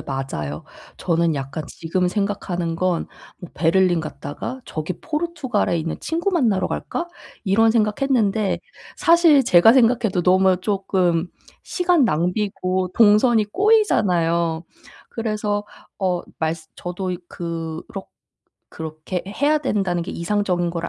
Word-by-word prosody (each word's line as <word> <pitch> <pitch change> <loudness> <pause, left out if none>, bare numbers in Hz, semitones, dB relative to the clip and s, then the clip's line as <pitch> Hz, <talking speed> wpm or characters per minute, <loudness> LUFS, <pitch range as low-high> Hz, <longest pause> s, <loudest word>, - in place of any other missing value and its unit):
맞아요. 105 - -5 0.3
저는 170 -1 +1
약간 140 +3 -5
지금 180 +4 -2
생각하는 180 -4 -2
건 180 -1 0 0.3
뭐 175 - -10
'베를린 175 +2 +2
갔다가 155 - -6
저기 155 +3 -4
포르투갈에 300 - -1
있는 160 0 -3
친구 335 +5 -1
만나러 235 - +1
갈까?' 345 - -4 0.4
이런 225 +3 +4
생각했는데. 215 -2 +1 0.4
사실 335 -5 +5
제가 180 +1 +6
생각해도 230 -7 +3
너무 185 +1 +4
쪼끔 185 -4 0 0.3
시간 355 -5 +2
낭비고 185 +1 -1
동선이 220 +1 +5
꼬이잖아요. 175 - +2 0.5
그래서 210 -2 -2 0.3
어 180 -3 0 0.2
말쓰 160 0 -3
저도 180 +1 -5
이 180 - -3
그럭 165 +2 -6 0.6
그렇게 160 +3 -5
해야 285 +10 +1
된다는 195 - -1
게 170 - -6
이상적인 175 -1 -1
거를 170 0 -4
185 Hz, 275 characters per minute, -21 LUFS, 170-225 Hz, 0.6 s, 제가